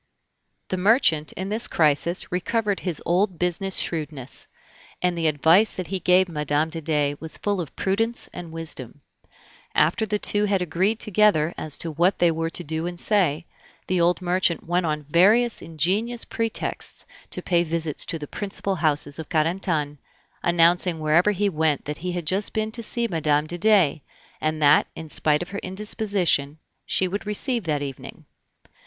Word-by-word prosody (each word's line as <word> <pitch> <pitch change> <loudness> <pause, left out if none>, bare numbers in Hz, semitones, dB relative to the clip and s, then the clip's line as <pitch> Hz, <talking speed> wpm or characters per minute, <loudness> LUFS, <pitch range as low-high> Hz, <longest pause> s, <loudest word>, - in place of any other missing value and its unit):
The 185 - -1
merchant 180 - +3
in 190 +2 -5
this 220 +3 +1
crisis 160 +3 +1
recovered 205 +3 -1
his 180 -4 0
old 180 +1 +1
business 180 +2 -1
shrewdness, 150 -5 -2 0.5
and 180 -1 0
the 165 -1 0
advice 160 +8 +4
that 180 -4 -6
he 190 0 -2
gave 185 +1 +3
Mme. 150 -1 -1
de 165 0 -5
Dey 145 -2 0
was 160 -1 -2
full 200 -3 -1
of 160 - -9
prudence 225 +5 0
and 170 -2 -8
wisdom. 150 -5 -6 0.7
After 170 +9 +2
the 210 0 0
two 205 0 +5
had 200 -2 +1
agreed 185 +6 0
together 200 -6 +2
as 155 -2 -4
to 165 - -3
what 175 +5 +2
they 175 -1 +3
were 165 0 -2
to 175 - -1
do 160 +2 -3
and 175 -1 -7
say, 180 -7 +1 0.4
the 180 -1 0
old 175 +1 +2
merchant 175 -2 0
went 175 0 0
on 150 -1 -2
various 215 +9 +3
ingenious 195 +10 -1
pretexts 225 -1 -3 0.2
to - - -6
pay 175 -2 +2
visits 160 -2 -2
to 165 - -1
the 150 - -7
principal 195 +2 -3
houses 150 -2 0
of 160 - -7
Carentan, 155 -3 -1 0.4
announcing 170 0 +3
wherever 155 +5 +3
he 205 0 +1
went 160 -5 0
that 150 +1 -5
he 180 +1 -4
had 175 -2 -4
just 190 +6 0
been 215 0 -1
to 235 - -4
see 235 +1 -2
Mme. 150 -5 +1
de 175 +3 -6
Dey, 185 -8 +3 0.4
and 155 0 -1
that, 145 +1 +5
in 160 -1 -8
spite 150 +1 +1
of 175 - -12
her 200 - -5
indisposition, 190 -7 0 0.3
she 185 - +2
would 200 +3 -5
receive 230 +1 -1
that 150 -3 -1
evening. 135 -2 -8
175 Hz, 175 wpm, -23 LUFS, 155-195 Hz, 0.7 s, two